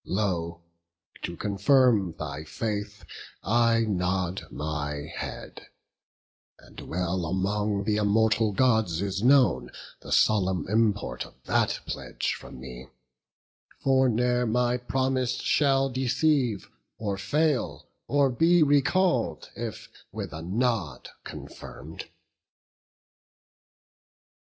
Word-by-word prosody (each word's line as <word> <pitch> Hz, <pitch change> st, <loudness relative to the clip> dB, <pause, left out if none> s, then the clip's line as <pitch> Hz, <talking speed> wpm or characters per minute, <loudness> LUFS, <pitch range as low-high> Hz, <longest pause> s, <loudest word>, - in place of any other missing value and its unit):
Lo, 85 Hz, -4 st, -2 dB, 0.6 s
to 85 Hz, -, -5 dB
confirm 105 Hz, -, +3 dB
thy 75 Hz, 0 st, -5 dB
faith, 105 Hz, +3 st, -4 dB, 0.4 s
I 115 Hz, +2 st, +3 dB
nod 95 Hz, -3 st, -1 dB
my 75 Hz, -1 st, -4 dB
head; -, -, -7 dB, 0.9 s
And -, -, -15 dB
well 90 Hz, +1 st, -2 dB
among 100 Hz, +3 st, -1 dB
th' -, -, -1 dB
immortal 110 Hz, +1 st, +3 dB
Gods 110 Hz, -7 st, +2 dB
is 100 Hz, -1 st, -2 dB
known 130 Hz, +2 st, +4 dB, 0.3 s
The -, -, -11 dB
solemn 95 Hz, -6 st, +2 dB
import 105 Hz, 0 st, 0 dB
of -, -, -20 dB
that -, -, +1 dB
pledge -, -, -3 dB
from -, -, -10 dB
me: 65 Hz, 0 st, -9 dB, 1.0 s
For 130 Hz, -1 st, +4 dB
ne'er 125 Hz, +1 st, +1 dB
my 120 Hz, +2 st, +1 dB
promise 130 Hz, 0 st, 0 dB
shall 135 Hz, -2 st, +2 dB
deceive, 130 Hz, -3 st, +1 dB, 0.3 s
or 100 Hz, -3 st, -3 dB
fail, 145 Hz, +5 st, 0 dB, 0.2 s
Or 140 Hz, -1 st, +3 dB
be 165 Hz, +6 st, +4 dB
recall'd, 150 Hz, +6 st, +2 dB
if -, -, -6 dB, 0.2 s
with 100 Hz, -6 st, -6 dB
a 80 Hz, -, -6 dB
nod 105 Hz, -, -1 dB
confirm'd." -, -, -9 dB
110 Hz, 100 wpm, -27 LUFS, 95-125 Hz, 1.0 s, known